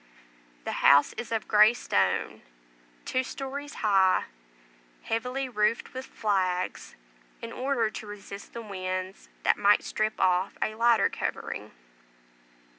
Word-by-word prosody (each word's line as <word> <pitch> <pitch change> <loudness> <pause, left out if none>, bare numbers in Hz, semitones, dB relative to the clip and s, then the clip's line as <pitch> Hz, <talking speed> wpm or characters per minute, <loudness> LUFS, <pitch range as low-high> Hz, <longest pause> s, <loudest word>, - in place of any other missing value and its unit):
The - - -3
house 140 +1 +6
is 240 - -7
of 225 -2 -2
grey 215 +2 +6
stone, 95 - 0 0.6
two 255 - 0
stories 275 +3 -6
high, 195 -3 +4 0.8
heavily 250 +4 -2
roofed 220 -1 0
with 260 +1 -6
flags, 185 -4 -1 0.4
in 230 - -7
order 250 -4 0
to 215 - -8
resist 200 -1 -9
the 235 - -6
winds 185 -2 -5
that - - +3
might 205 +1 +4
strip 215 0 -2
off 185 +1 +2
a 215 - -1
lighter 230 -1 +4
covering. - - -4
215 Hz, 120 wpm, -28 LUFS, 190-240 Hz, 0.8 s, house